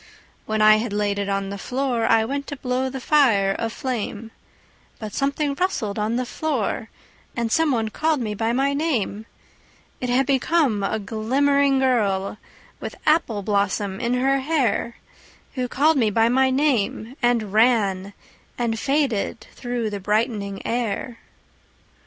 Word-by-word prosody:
When 215 0 +1
I 215 0 +7
had 220 -1 -3
laid 205 -1 0
it 200 0 -2
on 195 0 -2
the 200 - -6
floor 250 -1 -1
I 220 0 +4
went 280 +3 -3
to 285 - -5
blow 260 -1 -1
the 265 +1 -6
fire 230 -9 +3
aflame, 225 -2 -4 0.7
But 215 -3 -7
something 280 +1 0
rustled 255 - -2
on 215 +2 0
the 250 +1 -1
floor, 240 -6 -2 0.5
And 235 -2 -2
some 320 +3 +3
one 225 -3 0
called 310 +5 0
me 215 -4 -2
by 225 +2 -1
my 270 +3 +1
name: 240 -8 -1 0.7
It 250 - -3
had 255 +2 +3
become 270 -4 +2
a 195 - -1
glimmering 270 +7 +1
girl 210 -7 +1 0.4
With - - -6
apple 275 -10 +2
blossom 200 -1 0
in 240 0 0
her 270 +2 +2
hair 265 -5 0 0.6
Who 255 -2 -2
called 295 +5 +2
me 225 -5 +3
by 225 +2 +3
my 260 +2 +3
name 260 -4 0
and 235 -5 +1
ran 205 -4 +2 0.4
And 230 -2 -1
faded 270 -6 0
through 240 -3 -3
the 205 - -4
brightening 210 -1 -1
air. 230 0 -2
235 Hz, 150 wpm, -23 LUFS, 210-270 Hz, 0.7 s, I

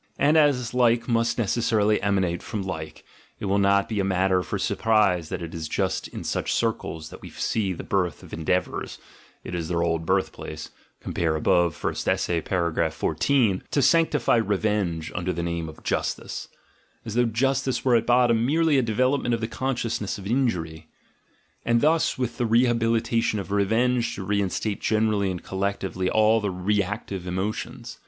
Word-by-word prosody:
And 150 +2 +3
as 140 -6 +3
like 120 -1 +3
must 115 -1 +1
necessarily 110 -2 +1
emanate 95 -4 0
from 105 -3 -4
like, 80 -5 -6 0.4
it - - -4
will 100 +1 +2
not 100 0 +3
be 110 -3 -2
a - - +2
matter 95 -1 +2
for - - -4
surprise 100 -7 +1
that - - -4
it 85 - -7
is 80 -1 -4
just - - -1
in - - -8
such - - -2
circles 80 -8 -2
that - - -11
we - - -9
see 105 -4 -1
the 90 - -5
birth 90 -5 -1
of - - -13
endeavours 90 +3 -2 0.5
(it - - -7
is 85 -2 -3
their 85 -1 0
old 80 -1 0
birthplace 80 -4 -2
— - - -39
compare 80 -2 -1
above, 85 +1 +2
First - - -2
Essay, 85 -2 0
paragraph 85 -3 -1
14), 100 - +1
to 140 - +1
sanctify 155 -5 +3
revenge 100 -6 0
under 90 +1 -2
the 85 -1 -3
name 85 -1 -3
of 80 - -13
justice - - -3 0.6
(as 110 - -5
though 120 +1 +3
Justice 135 +4 0
were 125 -2 +4
at 115 - +1
bottom 120 -2 +4
merely 155 +2 +3
a - - +3
development 125 +2 +1
of - - -5
the 110 - -2
consciousness 120 -5 -2
of 100 - -10
injury), 90 -10 -1 0.8
and 115 0 +2
thus 160 +5 +2
with 125 -1 -3
the 120 - +1
rehabilitation 115 -1 +2
of 100 -1 -5
revenge 115 +4 +1
to 95 - -6
reinstate 100 +1 -1
generally 105 -2 +1
and 90 -2 -5
collectively 95 -1 -2
all 110 +1 +3
the 105 - -1
reactive 95 0 -2
emo 95 +4 -1
tions. 115 +1 -8
105 Hz, 175 wpm, -25 LUFS, 90-115 Hz, 0.8 s, were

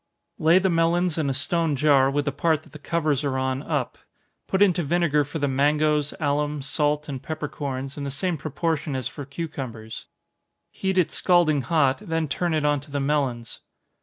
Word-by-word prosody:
Lay 160 +3 +5
the 190 +1 +3
melons 170 0 +2
in 145 -3 0
a - - 0
stone 160 +2 0
jar, 140 -1 +4
with 145 +1 -1
the 140 - 0
part 155 +2 +1
that - - -19
the 155 - -11
covers 155 -3 0
are 135 -2 -1
on, 130 0 -1
up. 150 -5 -3 0.5
Put 190 +1 +3
into 180 -4 +3
vinegar 155 -2 +2
for 145 +3 -6
the 145 -2 0
mangoes, 150 +2 +2
alum, 145 -1 -1
salt 150 +1 0
and 135 -3 -5
peppercorns, 145 -3 -5
in - - -4
the 140 - -3
same 175 +6 -1
proportion 155 0 -2
as 130 -2 -2
for 145 - -8
cucumbers 130 -7 -7 0.6
heat 190 -1 -2
it 180 - +3
scalding 170 -6 +3
hot, 135 0 +2
then 165 -6 -2
turn 170 +3 -1
it 155 -1 0
on 145 -1 +2
to 145 +3 -15
the 145 0 -2
melons. 135 -5 -1
150 Hz, 190 wpm, -24 LUFS, 140-165 Hz, 0.6 s, Lay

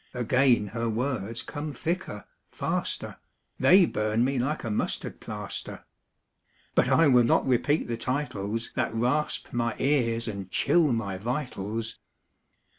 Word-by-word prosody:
Again 125 -2 +3
her 115 +1 -2
words 115 -2 -2
come 150 0 -5
thicker, 165 - -3 0.2
faster, - - -3 0.4
They 185 0 +7
burn 110 -3 0
me 135 0 0
like 145 +5 -1
a 115 - -3
mustard 105 - -2
plaster. - - -5 0.9
But - - +3
I 165 - +5
will 125 -3 +6
not 115 - +3
repeat 135 +4 +1
the 115 - -2
titles 115 -4 -3
That 115 - -1
rasp 125 +6 0
my 115 -1 0
ears 120 -5 +1
and 100 -3 -5
chill 160 - +3
my 100 -5 -2
vitals. 115 -2 -4
120 Hz, 130 wpm, -27 LUFS, 110-140 Hz, 0.9 s, They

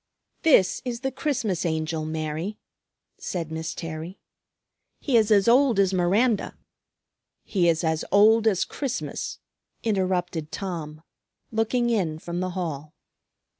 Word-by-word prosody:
"This 270 - +4
is 245 -2 -4
the 265 -1 -1
Christmas 255 - -1
Angel, 160 -1 -1
Mary," 155 +5 -3 0.6
said 165 -4 -4
Miss 160 0 -4
Terry. 165 +3 -6 0.8
"He 275 - 0
is 220 -2 +4
as 205 -1 +4
old 250 -1 +5
as 195 -1 +3
Miranda 200 +6 +1 0.4
" - - -60 0.3
"He 175 -4 +2
is 165 +1 +1
as 160 -1 0
old 220 +2 +5
as 195 -5 +2
Christmas," 270 -4 -4 0.5
interrupted 180 -6 -1
Tom, 160 -5 -5 0.5
looking 235 +2 +1
in 175 -9 0
from 170 +2 -5
the 185 0 -1
hall. 155 -4 -4
185 Hz, 130 wpm, -25 LUFS, 160-225 Hz, 0.8 s, old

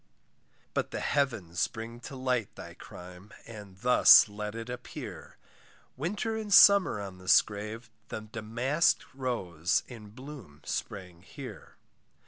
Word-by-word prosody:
But - - -1
the - - -4
heavens 110 - 0
bring 115 +1 -8
to 130 +3 -9
light 130 -4 -2
Thy - - -10
crime, 90 +3 -12
and 105 -4 -11
thus 125 -2 +7
let 105 +1 -6
it 115 0 -6
appear, 125 0 -8 0.6
Winter 205 - -3
and 215 -2 -5
summer 200 - +7
on 95 -2 -8
this 95 +1 +5
grave, 110 +3 -7 0.2
The - - -6
damask 120 +9 0
rose 95 - -1
in 110 -4 -11
bloom 125 - -12
spring 90 -3 -5
here. - - -11
115 Hz, 125 wpm, -29 LUFS, 100-130 Hz, 0.6 s, thus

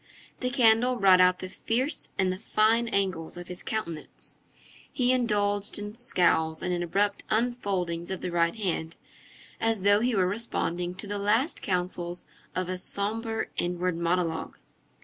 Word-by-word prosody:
The 250 - -1
candle 245 -1 +4
brought 190 -5 +6
out 180 0 +5
the 185 - -4
fierce 245 - -1
and 185 -1 +2
the 185 - -8
fine 225 +2 +2
angles 185 -7 -1
of 175 0 -8
his 180 - -6
countenance. 170 -8 -2 0.5
He 250 -2 +2
indulged 205 -5 +1
in 205 0 -5
scowls 175 -9 +1
and 180 - 0
in 175 - -1
abrupt 200 +4 0
unfoldings 195 -8 -1
of 190 - -4
the 180 - -3
right 170 +2 +2
hand, 170 -6 -2 0.6
as 225 -4 0
though 205 +1 +5
he 240 +1 +1
were 190 -2 +3
responding 180 -4 -2
to 195 - -5
the 205 0 -3
last 225 +10 +1
counsels 180 -2 -3 0.3
of 185 -1 -1
a 185 0 -3
sombre 225 +4 -2
inward 180 0 -1
monologue. 170 -1 -1
195 Hz, 155 wpm, -28 LUFS, 180-225 Hz, 0.6 s, brought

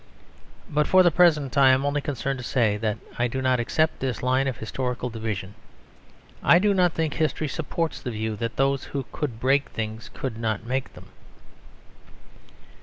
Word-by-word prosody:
But, 150 0 +1
for 185 0 +6
the 175 - +5
present, 150 -6 +3
I 135 -1 +7
am 130 +1 +3
only 145 0 0
concerned 135 -2 -3
to - - -6
say 115 -4 +1
that 105 0 -2 0.2
I 120 - +3
do 130 +3 -3
not 130 -1 +2
accept 155 +7 +1
this 130 -3 -3
line 130 +2 +2
of 130 -4 -2
historical 125 +2 -3
division. 105 -3 -4 0.9
I 170 - +6
do 205 +3 +3
not 180 -3 +3
think 160 -2 -1
history 155 -1 -1
supports 165 +3 -3
the 125 - -4
view 110 -1 -3
that 115 +1 -3
those 135 0 +1
who 135 -2 -4
could 130 -7 -4
break 135 +3 +2
things 110 0 -5
could 120 -4 -5
not 110 -1 -2
make 130 +2 -3
them. - - -13
130 Hz, 180 wpm, -25 LUFS, 115-145 Hz, 0.9 s, I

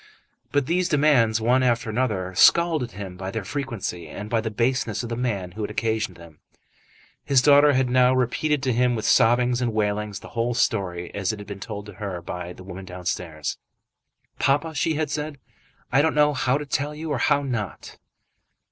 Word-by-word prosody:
But 145 -1 +1
these 175 +4 +1
demands, 135 -7 +3
one 125 +4 +3
after 120 -1 +1
another, 105 -6 -1
scalded 160 - +4
him 95 -2 -7
by 95 0 -5
their 110 +1 -4
frequency, 115 - -4
and 105 +7 -8
by 115 -1 +2
the 110 - -3
baseness 120 0 0
of 120 - -5
the 115 - -2
man 105 -7 -2
who 105 +5 -7
had 105 - -2
occasioned 110 -5 -2
them. 85 -3 -15 0.8
His 140 -2 +4
daughter 145 0 +6
had 130 -1 +2
now 125 +1 +4
repeated 135 +3 0
to 130 -2 +1
him 125 +1 +2
with 110 - -3
sobbings 120 +2 +3
and 120 -2 0
wailings 105 -1 -1
the - - -11
whole 115 +1 -1
story 90 -7 -1
as 100 -1 -1
it 110 - -6
had 105 - -9
been 100 -1 -7
told 105 0 -6
to 105 - -10
her 95 -4 -3
by 90 +1 -6
the 90 - -11
woman 95 0 -8
downstairs. 90 -4 -4 0.8
"Papa," 145 +4 +1
she 155 +2 0
had 155 -1 -1
said, 150 -1 -3 0.5
"I 135 - +5
don't 160 +1 +1
know 150 0 +4
how 130 -1 +1
to 150 - -5
tell 145 +2 -2
you 155 0 -5
or 140 - 0
how 145 +2 +2
not." 110 - -5
115 Hz, 195 wpm, -24 LUFS, 100-140 Hz, 0.8 s, daughter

